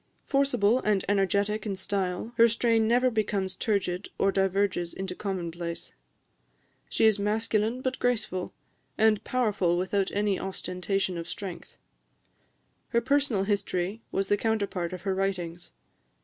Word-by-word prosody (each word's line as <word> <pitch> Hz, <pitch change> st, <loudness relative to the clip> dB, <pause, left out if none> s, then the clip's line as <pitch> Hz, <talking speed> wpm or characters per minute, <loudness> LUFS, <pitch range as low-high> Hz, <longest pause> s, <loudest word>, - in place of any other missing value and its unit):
Forcible 250 Hz, -5 st, +3 dB
and 210 Hz, -5 st, +1 dB
energetic 200 Hz, +2 st, +1 dB
in 205 Hz, -3 st, -2 dB
style, 190 Hz, +2 st, -2 dB
her 230 Hz, 0 st, +8 dB
strain 230 Hz, -1 st, +2 dB
never 250 Hz, +2 st, +3 dB
becomes 200 Hz, -4 st, -1 dB
turgid 195 Hz, -3 st, -1 dB
or 195 Hz, -, +3 dB
diverges 195 Hz, -2 st, 0 dB
into 190 Hz, -1 st, -4 dB
commonplace. 170 Hz, -3 st, -4 dB, 1.0 s
She -, -, +3 dB
is 215 Hz, -2 st, +4 dB
masculine, 220 Hz, +3 st, 0 dB
but 260 Hz, 0 st, -2 dB
graceful; 215 Hz, -7 st, -1 dB, 0.5 s
and 220 Hz, -2 st, +3 dB
powerful 205 Hz, -8 st, +1 dB
without 190 Hz, +2 st, 0 dB
any 205 Hz, -1 st, 0 dB
ostentation 190 Hz, -1 st, -2 dB
of 165 Hz, -, -7 dB
strength. 185 Hz, -4 st, -7 dB, 1.1 s
Her 235 Hz, -, +2 dB
personal 275 Hz, -5 st, +2 dB
history 200 Hz, 0 st, -1 dB
was 195 Hz, 0 st, 0 dB
the 205 Hz, -, +3 dB
counterpart 200 Hz, -5 st, -1 dB
of 180 Hz, -1 st, -7 dB
her 195 Hz, -1 st, 0 dB
writings. 180 Hz, -3 st, -3 dB
200 Hz, 130 wpm, -28 LUFS, 185-220 Hz, 1.1 s, her